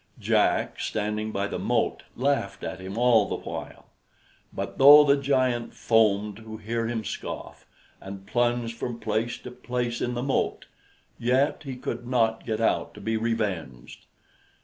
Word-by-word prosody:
Jack, - - +1
standing 105 0 -2
by 100 -1 -1
the - - -4
moat, - - 0
laughed 130 -6 -1
at 95 - -5
him 95 +3 -7
all 120 -4 +4
the - - -1
while; - - -7 0.7
but - - -5
though 145 +2 +10
the 140 -1 +4
giant 130 -4 0
foamed 105 -2 +2
to 110 -1 -9
hear 115 +1 -2
him 115 -1 -2
scoff, - - -7 0.3
and 95 0 -9
plunged 120 +1 0
from 115 0 -5
place 115 +2 -1
to 125 - -10
place 125 -1 -3
in 125 0 -1
the 120 - -2
moat, 135 0 -1 0.5
yet 130 +4 +1
he 135 -2 -5
could 120 -1 -5
not 115 -3 +1
get 110 -1 -1
out 115 - 0
to - - -10
be 110 0 -2
revenged. 100 - -3
115 Hz, 155 wpm, -26 LUFS, 105-125 Hz, 0.7 s, though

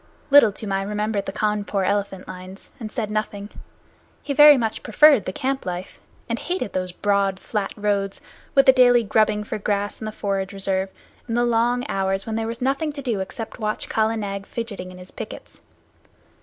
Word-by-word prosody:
Little 280 -7 +8
Toomai 195 -1 -3
remembered 210 0 -2
the - - -2
Cawnpore 205 -1 -1
elephant 200 -2 -1
lines 185 +1 -10
and 220 -3 -6
said 215 -4 -3
nothing. 210 -1 -3 0.7
He 285 - -2
very 295 0 +9
much 225 -3 -2
preferred 280 +1 +5
the - - -2
camp 265 +6 -2
life, 180 0 -6 0.3
and 230 0 -2
hated 355 - -3
those 185 -1 -2
broad, 200 0 0
flat 210 -3 -3
roads, 200 -1 -1 0.4
with 275 0 +6
the 265 - +8
daily 245 -2 +5
grubbing 215 0 +2
for 215 0 -5
grass 205 +1 -2
in - - -4
the 215 - -3
forage 195 -2 -2
reserve, 195 -1 -1 0.4
and 230 0 -1
the 240 - +3
long 240 +2 +1
hours 195 -2 -1
when 225 - -4
there 225 0 -1
was 230 +2 -5
nothing 275 +4 0
to 280 -1 -7
do 230 -6 -1
except 205 +4 -5
to - - -15
watch 215 0 -2
Kala 220 +1 +1
Nag 200 -1 -4
fidgeting 205 -6 -6
in 180 - -12
his 180 0 -11
pickets. - - -9
210 Hz, 190 wpm, -23 LUFS, 195-235 Hz, 0.7 s, very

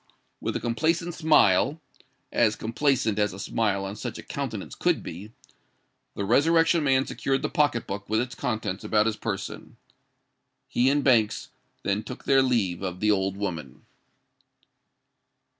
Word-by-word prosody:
With - - -3
a - - 0
complacent 165 +9 0
smile—as 145 - +1
complacent 115 -1 0
as 105 -2 +1
a 95 - -9
smile 100 -2 0
on 95 +1 -5
such - - -5
a - - -9
countenance - - -5
could - - 0
be—the 100 +1 -11
Resurrection 165 - +4
Man 135 -1 +3
secured 135 0 -1
the - - 0
pocket 145 -6 +1
book 100 +1 -6
with 110 +1 +2
its 120 +1 -2
contents 110 -6 -3
about 105 -1 +2
his 110 -1 0
person. 105 -4 -5 0.9
He 125 +2 +2
and 145 +1 +2
Banks 115 -6 +2 0.3
then 100 +1 0
took 125 +4 -9
their 135 -1 +5
leave 110 -10 +1
of 90 -2 -4
the 105 0 +3
old 95 -1 0
woman. 85 -10 -5
110 Hz, 140 wpm, -26 LUFS, 100-135 Hz, 0.9 s, their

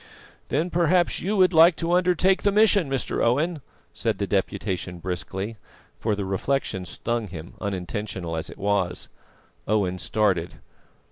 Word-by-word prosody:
"Then 165 +5 -1
perhaps 175 +1 +2
you 205 +4 -1
would 185 -1 +5
like 165 +1 +7
to 165 +1 -2
undertake 180 +1 +3
the 205 - +2
mission, 205 -6 +4
Mr. 135 -1 -1
Owen," 150 +7 +1 0.3
said - - -1
the - - -1
Deputation 90 -1 -2
briskly; 95 +5 -4 0.4
for 110 -2 0
the 100 -1 -3
reflection 95 -1 -1
stung 115 +5 -3
him, 85 -2 -9
unintentional 95 -3 -4
as 80 - -4
it - - -11
was. 100 -3 -1 0.6
Owen 95 -4 +1
started. 95 -7 0
110 Hz, 140 wpm, -25 LUFS, -, 0.6 s, like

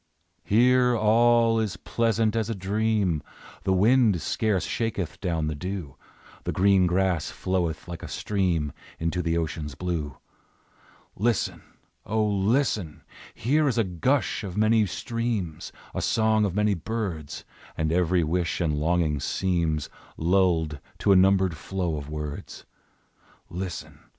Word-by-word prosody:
Here 125 +2 +4
all 115 +1 +4
is 105 -7 -2
pleasant 115 +1 0
as 110 -1 0
a 115 - -2
dream; 100 -3 0 0.4
The 95 - +2
wind 105 0 +4
scarce 100 +4 0
shaketh 105 -7 -3
down 85 -4 -1
the 75 - -1
dew, 90 -2 -5 0.5
The - - -2
green 95 -1 +4
grass 90 -3 +1
floweth 85 -4 -2
like 85 -1 -7
a - - -7
stream 90 -8 -1 0.2
Into 85 +2 -1
the 85 -1 0
ocean's 80 -3 -3
blue; 80 -6 -3 1.0
Listen! 115 +1 0 0.4
O, 110 0 0
listen! 105 - 0 0.3
Here 150 +7 +2
is 125 - 0
a 115 - +4
gush 110 - 0
of 95 -1 -6
many 110 0 +4
streams, 110 -6 -3 0.2
A - - -2
song 110 -1 +2
of 95 -3 -2
many 105 0 +2
birds, 85 -5 -4 0.3
And 80 0 0
every 90 0 +2
wish 85 +1 -1
and 75 -4 0
longing 80 -2 +1
seems 85 -3 0 0.3
Lulled 85 -4 +2 0.2
to 100 - +2
a - - +7
numbered 95 -1 +4
flow 90 +1 -3
of 70 0 -7
words, 75 -1 -6 0.9
Listen! 90 0 -6
95 Hz, 135 wpm, -26 LUFS, 80-110 Hz, 1.0 s, a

